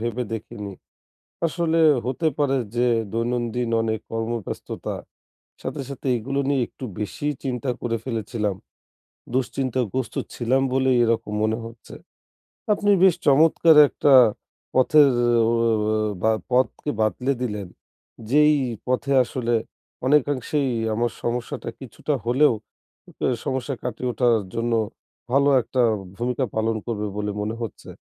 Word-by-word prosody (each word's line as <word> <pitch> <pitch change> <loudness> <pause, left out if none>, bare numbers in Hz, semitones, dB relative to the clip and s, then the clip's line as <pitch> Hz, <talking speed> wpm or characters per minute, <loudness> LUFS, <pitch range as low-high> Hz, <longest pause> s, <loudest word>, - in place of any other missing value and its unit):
ভেবে 120 +2 -2
দেখিনি? 105 -2 -7 0.7
আসলে 165 0 0 0.3
হতে 135 +6 0
পারে 140 -2 +2 0.2
যে, 120 +1 +2 0.3
দৈনন্দিন 120 0 -1
অনেক 110 -1 -1
কর্মব্যস্ততা। 115 -1 -4 0.7
সাথে, 145 - -4
সাথে 140 0 -8
এইগুলো 135 +4 -2
নিয়ে 135 -3 +2
একটু 130 - -10
বেশিই 145 +8 -3
চিন্তা 130 0 -2
করে 115 -1 -1
ফেলেছিলাম। 110 -4 -2 0.8
দুশ্চিন্তাগ্রস্ত 130 -2 -1 0.2
ছিলাম 130 +3 +1
বলেই 130 -1 +3
এরকম 115 -2 0
মনে 110 +1 +1
হচ্ছে। 115 0 -12 0.8
আপনি 205 0 +1
বেশ 190 -3 +6
চমৎকার 160 +3 +5
একটা 140 - +2 0.6
পথের 140 +2 +5 0.2
এ - - +3 0.2
অ - - +2 0.2
আ - - +3 0.5
বা 110 - +3 0.2
পথকে 130 +3 +1
বাতলে 125 +5 0
দিলেন, 105 -6 -3 0.6
যেই 150 +2 +5 0.3
পথে 130 +2 0
আসলে 120 -1 -2 0.5
অনেকাংশেই 145 0 +1 0.2
আমার 120 +2 0
সমস্যাটা 120 0 -3
কিছুটা 135 +3 -4
হলেও 125 +3 +4 0.6
অক - - -19 0.3
সমস্যা 130 -1 -2
কাটিয়ে 125 +1 -3
ওঠার 120 0 +3 0.2
জন্য 115 0 0 0.6
ভালো 140 +2 +4
একটা 125 +3 -1 0.3
ভূমিকা 125 +2 -1
পালন 110 +1 +1
করবে 105 -3 -2
বলে 105 0 -2
মনে 110 +2 -3
হচ্ছে। 115 - -7
125 Hz, 120 wpm, -23 LUFS, 115-135 Hz, 0.8 s, বেশ